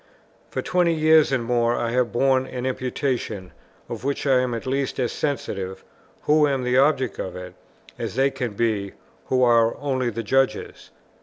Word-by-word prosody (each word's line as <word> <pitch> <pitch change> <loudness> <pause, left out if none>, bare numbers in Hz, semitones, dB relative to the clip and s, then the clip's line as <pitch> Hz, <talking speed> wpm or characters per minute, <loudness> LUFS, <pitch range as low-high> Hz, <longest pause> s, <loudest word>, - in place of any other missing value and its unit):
For - - -3
twenty 175 -2 +2
years 155 -1 +4
and 130 -3 +1
more 120 0 +1
I 120 -1 -1
have 125 -1 +1
borne 130 +1 +2
an 125 0 -5
imputation, 125 -6 -3 0.4
of - - -7
which 140 +2 -2
I 135 -2 +4
am 125 -2 -1
at 115 - -6
least 135 +1 -2
as 125 -2 0
sensitive, 95 -10 -3 0.4
who 150 0 +4
am 135 -2 -1
the 125 0 0
object 135 -5 +2
of 95 - -4
it, 90 0 -8 0.5
as - - -4
they 135 +1 +2
can 125 -5 -4
be, 100 -3 -1 0.3
who 130 -1 +2
are 115 -2 +4
only 130 -3 -1
the 115 0 -4
judges. 135 +4 -1
125 Hz, 175 wpm, -23 LUFS, 115-135 Hz, 0.5 s, years